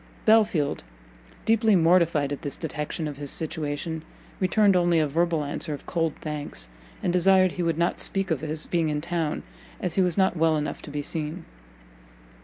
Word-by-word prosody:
Belfield, 205 - +3 0.6
deeply 225 -1 +4
mortified 165 -4 +3
at 145 - -4
this 145 -4 -4
detection 155 0 -4
of 145 -2 -6
his 145 -1 -5
situation, 160 +1 -3 0.4
returned 200 +1 +4
only 175 -1 +3
a 155 -1 +3
verbal 165 +1 +1
answer 145 +2 -2
of - - -13
cold 165 -3 -1
thanks, 145 - -4 0.3
and 175 - +1
desired 185 +1 +5
he 180 - -4
would 165 -2 0
not 170 +1 +1
speak 195 -2 -1
of 150 -5 0
his 155 0 -4
being 165 -3 0
in 150 -1 -1
town, 165 -1 -2 0.4
as 180 -3 -2
he 190 - +2
was 180 -1 +1
not 190 -2 +3
well 160 -1 +3
enough 150 0 -3
to - - -9
be 145 0 -3
seen. 160 +3 -4
165 Hz, 180 wpm, -26 LUFS, 150-180 Hz, 0.6 s, desired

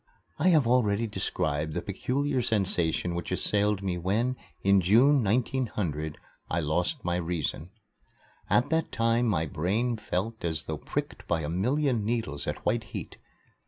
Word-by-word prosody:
I 165 - +3
have 160 -7 +5
already 115 -3 +2
described 80 -7 -2
the - - -2
peculiar 130 +7 -1
sensation 90 -6 +1
which 85 +1 -4
assailed 105 +1 +1
me 90 -2 -1
when, 110 +8 0 0.3
in 100 0 +5
June, 120 +9 +5
1900, 105 - -1 0.3
I 85 - 0
lost 90 - -1
my 90 0 +1
reason. 85 -1 -3 0.8
At 125 +5 +3
that 160 0 +1
time 115 +1 +2
my 90 -7 +1
brain 105 - 0
felt 110 +2 -3
as 80 -4 0
though - - -3
pricked - - -4
by 85 -2 +1
a 75 - -3
million 125 - +1
needles 110 -11 -2
at - - -4
white 115 0 +1
heat. - - -6
105 Hz, 150 wpm, -28 LUFS, 85-120 Hz, 0.8 s, have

